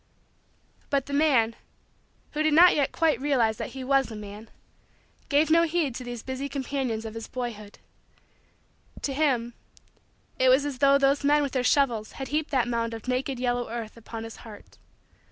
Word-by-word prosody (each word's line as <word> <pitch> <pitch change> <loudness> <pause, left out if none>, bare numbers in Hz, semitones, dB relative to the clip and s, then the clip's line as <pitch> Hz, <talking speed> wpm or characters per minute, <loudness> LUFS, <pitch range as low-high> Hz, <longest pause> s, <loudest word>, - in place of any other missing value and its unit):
But 275 -2 +1
the 280 - -7
man, 265 -7 +3 0.8
who 300 - -2
did 310 -1 +3
not 350 +2 +7
yet 285 -2 +1
quite 310 -7 +1
realize 245 -7 +1
that - - -6
he 260 - -5
was 270 0 +2
a 220 - -7
man, 210 +1 -9 0.8
gave 300 +2 +3
no 335 +1 +6
heed 330 -5 0
to 250 - -6
these 245 -2 -7
busy 265 +2 -4
companions 265 -5 -3
of 220 - -6
his 225 0 -7
boyhood. 225 -5 -6 1.3
To 275 - -1
him, 260 -5 0 0.9
it 260 - +5
was 265 +3 +4
as 280 -3 -4
though 275 +1 +5
those 275 +1 +2
men 295 +1 +4
with 280 - -2
their 255 -1 0
shovels 240 -6 +1
had 270 - -6
heaped 305 +1 -1
that 255 -4 +1
mound 230 -1 -2
of 225 +2 -10
naked, 255 +1 -1
yellow, 245 -1 -1
earth 230 -2 -6
upon 225 0 -8
his 225 0 -9
heart. 215 -3 -13
260 Hz, 180 wpm, -26 LUFS, 230-285 Hz, 1.3 s, not